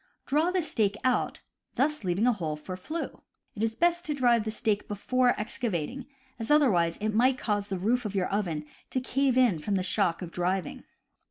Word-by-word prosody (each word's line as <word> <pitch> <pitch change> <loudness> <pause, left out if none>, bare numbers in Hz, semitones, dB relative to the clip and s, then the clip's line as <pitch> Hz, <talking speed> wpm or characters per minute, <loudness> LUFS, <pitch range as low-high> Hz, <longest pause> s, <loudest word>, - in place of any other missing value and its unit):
Draw 305 +5 +2
the 365 -1 0
stake 210 -9 +1
out, 255 -1 +1 0.3
thus 300 0 +1
leaving 185 +4 +1
a 250 - +4
hole 160 -7 -3
for 165 +5 -7
flue. 310 - -5 0.3
It 215 - -7
is 225 0 0
best 345 +3 +2
to 300 - -1
drive 240 -4 +3
the - - -1
stake 215 -2 -1
before 245 +4 +1
excavating, 235 - -3 0.3
as 225 - -4
otherwise 195 - +4
it 215 +1 -2
might 255 +4 +3
cause 205 -4 -1
the 195 -2 -3
roof 230 +7 +1
of 205 -2 -4
your 190 -2 +1
oven 170 -7 -1 0.2
to 255 - 0
cave 260 0 +1
in 240 -10 +4
from 200 +7 -1
the 185 - 0
shock 185 -2 +1
of 170 - -7
driving. 180 +2 -2
220 Hz, 195 wpm, -28 LUFS, 190-255 Hz, 0.3 s, a